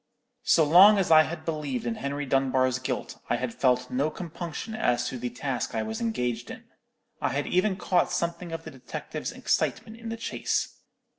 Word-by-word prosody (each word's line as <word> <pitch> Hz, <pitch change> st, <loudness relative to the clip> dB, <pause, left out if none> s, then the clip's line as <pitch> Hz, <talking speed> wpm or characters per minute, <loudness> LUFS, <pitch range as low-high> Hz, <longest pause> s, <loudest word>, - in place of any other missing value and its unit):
So 165 Hz, -, +5 dB
long 185 Hz, +7 st, +8 dB
as 190 Hz, -4 st, +1 dB
I 155 Hz, -1 st, +9 dB
had 155 Hz, 0 st, -4 dB
believed 150 Hz, -6 st, -3 dB
in 120 Hz, -, 0 dB
Henry 140 Hz, +4 st, -3 dB
Dunbar's 130 Hz, -1 st, +2 dB
guilt, 130 Hz, -, -4 dB
I -, -, +3 dB
had 120 Hz, -1 st, -3 dB
felt 125 Hz, 0 st, +1 dB
no 140 Hz, +4 st, +1 dB
compunction 170 Hz, +5 st, -6 dB
as 125 Hz, -, +1 dB
to 125 Hz, -, -6 dB
the 125 Hz, +1 st, -3 dB
task 125 Hz, -1 st, -3 dB
I 110 Hz, -, 0 dB
was 110 Hz, 0 st, -4 dB
engaged 125 Hz, -, -2 dB
in. -, -, -8 dB, 0.6 s
I -, -, +1 dB
had -, -, -1 dB
even 185 Hz, +2 st, +2 dB
caught 180 Hz, -2 st, +1 dB
something 170 Hz, 0 st, -2 dB
of 165 Hz, 0 st, -5 dB
the -, -, -8 dB
detective's 130 Hz, -2 st, -6 dB
excitement 220 Hz, 0 st, -1 dB
in 230 Hz, 0 st, -7 dB
the 225 Hz, -, -4 dB
chase. 230 Hz, -, -2 dB
145 Hz, 190 wpm, -27 LUFS, 125-175 Hz, 0.6 s, I